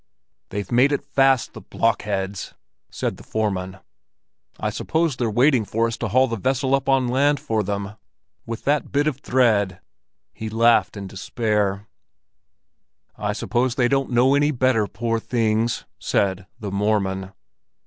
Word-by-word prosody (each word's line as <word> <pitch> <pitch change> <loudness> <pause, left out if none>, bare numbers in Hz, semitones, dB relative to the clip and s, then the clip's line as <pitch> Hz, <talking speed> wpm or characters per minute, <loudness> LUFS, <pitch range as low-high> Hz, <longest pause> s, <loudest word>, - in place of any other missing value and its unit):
"They've 100 +2 -5
made 125 +4 +4
it 145 - -1
fast, 135 -2 +2
the - - -9
blockheads," 100 -3 -2 0.3
said - - -3
the - - -13
foreman. 95 -4 -2 0.8
"I - - -1
suppose 160 -3 0
they're 120 -2 -1
waiting 125 +2 +3
for 115 +3 0
us 115 -1 -2
to 120 - -2
haul 130 +6 +3
the 115 - -3
vessel 130 +4 0
up 135 0 +1
on 135 -2 +3
land 140 +3 +2
for 110 -1 -1
them—with 105 +3 -7
that 145 +1 0
bit 145 +1 +2
of 150 -4 0
thread!" 110 -9 +2 0.5
He 110 - -6
laughed 115 0 +3
in 100 - -6
despair. 105 0 -1 1.3
"I 105 0 -2
suppose 120 +3 0
they 125 -2 +3
don't 135 +1 0
know 125 +2 +4
any 145 +1 +3
better, 130 -6 +2
poor 115 +2 -2
things!" 115 -1 0
said 95 -1 0
"the 105 -3 -5
Mormon." 100 -2 -1
115 Hz, 150 wpm, -22 LUFS, 105-130 Hz, 1.3 s, made